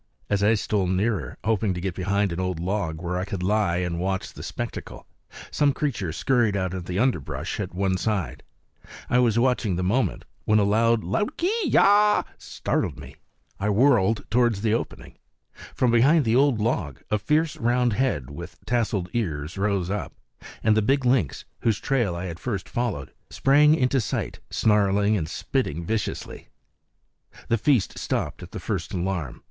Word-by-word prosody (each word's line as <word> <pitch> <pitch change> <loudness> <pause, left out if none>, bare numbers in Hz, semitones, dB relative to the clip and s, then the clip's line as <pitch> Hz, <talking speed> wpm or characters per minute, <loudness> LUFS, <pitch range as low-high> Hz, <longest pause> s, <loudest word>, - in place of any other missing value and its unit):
As 100 -1 +2
I 105 +2 +4
stole 100 -2 0
nearer, 95 - -1
hoping 105 -2 +1
to - - -4
get 95 0 -3
behind 100 +2 0
an 85 - -4
old 90 -2 -2
log 90 -3 -2
where 90 +1 -2
I - - -2
could 95 -2 -4
lie 100 -3 +1
and 90 -2 -2
watch 95 +1 -2
the - - -10
spectacle, - - -6 0.5
some 145 -2 +2
creature 115 - -2
scurried 120 - +1
out 95 -1 -2
of 90 -2 -5
the 90 +1 -3
underbrush 115 - -1
at - - -4
one 95 0 +1
side. 105 -3 -2 0.7
I 125 - +4
was 115 -3 +3
watching 120 -5 +2
the 90 - -2
movement, 115 +8 0 0.2
when 110 - +4
a 105 - +4
loud 115 +2 +2 0.3
kee 385 -1 0
yaaah! 210 -1 +5
startled - - -2
me; - - -11 0.4
I 100 +2 0
whirled 110 -2 +3
towards 120 -3 +2
the 110 -1 +2
opening. 115 - -5 0.6
From 125 -2 +2
behind 135 +6 +4
the 115 +1 +2
old 135 -3 +3
log 95 - -2
a 105 - +2
fierce 150 +8 +1
round 120 0 +1
head 100 - -1
with 85 +5 -9
tasseled 110 -7 0
ears 80 -8 -2
rose 100 -2 0
up, 105 - -3 0.5
and 110 -1 +4
the 110 - +3
big 135 +5 +1
lynx, 120 - +1
whose 115 -4 +1
trail 120 -10 0
I 85 +2 -4
had 85 -2 -6
first 100 -5 -3
followed, 110 - -3 0.2
sprang 150 +3 +4
into 130 -2 +2
sight - - -3
snarling 105 -1 +2
and 80 -6 -2
spitting 85 - -2
viciously. 110 +3 -4 1.0
The 115 - +2
feast 125 -2 +1
stopped - - -2
at - - -9
the - - -7
first - - -3
alarm. 90 -7 -3
105 Hz, 170 wpm, -25 LUFS, 90-120 Hz, 1.0 s, yaaah